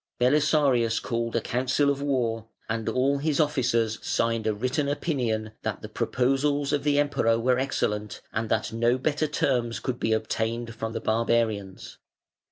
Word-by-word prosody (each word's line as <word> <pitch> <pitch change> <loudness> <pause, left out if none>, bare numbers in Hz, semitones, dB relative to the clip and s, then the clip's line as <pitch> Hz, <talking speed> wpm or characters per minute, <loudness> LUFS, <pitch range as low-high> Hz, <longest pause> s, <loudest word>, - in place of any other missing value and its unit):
Belisarius 135 -3 +3
called 115 -1 -3
a 115 - +2
council 130 +5 +1
of 140 0 -3
war, 120 -5 -1 0.2
and 115 -1 -2
all 135 +2 +1
his 150 0 0
officers 120 -7 +1
signed 115 -1 0
a 110 - +2
written 130 +6 -1
opinion 120 -8 -1
"that - - -4
the - - -5
proposals 140 +3 0
of 145 -1 0
the 145 -1 +2
Emperor 145 -6 +2
were 125 +2 +2
excellent, 105 -6 -2
and 110 0 -2
that 110 0 0
no 120 +2 +2
better 150 +3 0
terms 120 -5 0
could 125 -1 -3
be 110 - 0
obtained 110 +1 -1
from 110 0 -5
the - - -3
Barbarians". 110 -4 -1
120 Hz, 160 wpm, -26 LUFS, 115-140 Hz, 0.2 s, Belisarius